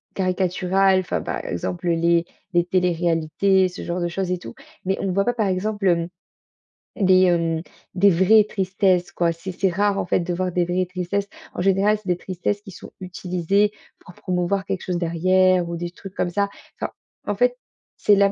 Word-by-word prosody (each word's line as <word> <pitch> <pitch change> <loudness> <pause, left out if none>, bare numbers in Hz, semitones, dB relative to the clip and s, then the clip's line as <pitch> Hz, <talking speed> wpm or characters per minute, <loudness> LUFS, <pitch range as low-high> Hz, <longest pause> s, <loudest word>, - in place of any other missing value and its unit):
caricatural, 185 0 +2
enfin, 185 - -3
par - - -4
exemple, 90 - -3
les 170 0 +2 0.3
les 175 0 +3
téléréalités, 180 +1 +2
ce 180 - -8
genre 175 +1 -3
de 175 - 0
choses 180 +1 -3
et 180 - -1
tout - - -10 0.3
mais 190 +1 0
on - - -2
ne 185 - 0
voit 195 +2 +2
pas 245 - +1
par 215 -3 +1
exemple, 195 +2 -1
hem, 170 -1 +2 0.9
des, 185 -3 +5
hem, 165 -2 +1 0.3
des 200 +2 +5
vraies 195 +4 +5
tristesses 190 -2 +1
quoi, 170 -1 +1
c'est 170 +3 -6
c'est 190 +1 0
rare 200 +2 +1
en - - -1
fait - - +2
de 175 +1 -2
voir 185 +1 -1
des 175 0 +1
vraies 180 +1 0
tristesses. 185 +2 -2 0.2
En - - -3
général, 195 +3 +3
c'est 210 - -17
des 175 - +2
tristesses 190 +3 -3
qui 200 - -10
sont 180 - -11
utilisées 185 +2 0 0.3
pour 180 - -15
promouvoir 185 +1 -1
quelque 190 -2 -3
chose 180 -1 -2
derrière 185 +1 +2
ou 170 - -3
des 175 0 -4
trucs 195 +2 -11
comme 175 - 0
ça, 200 +1 0 0.3
enfin, - - -3 0.4
en - - 0
fait, - - +2 0.4
c'est 205 - +4
là, 200 0 +4
185 Hz, 195 wpm, -22 LUFS, 175-195 Hz, 0.9 s, des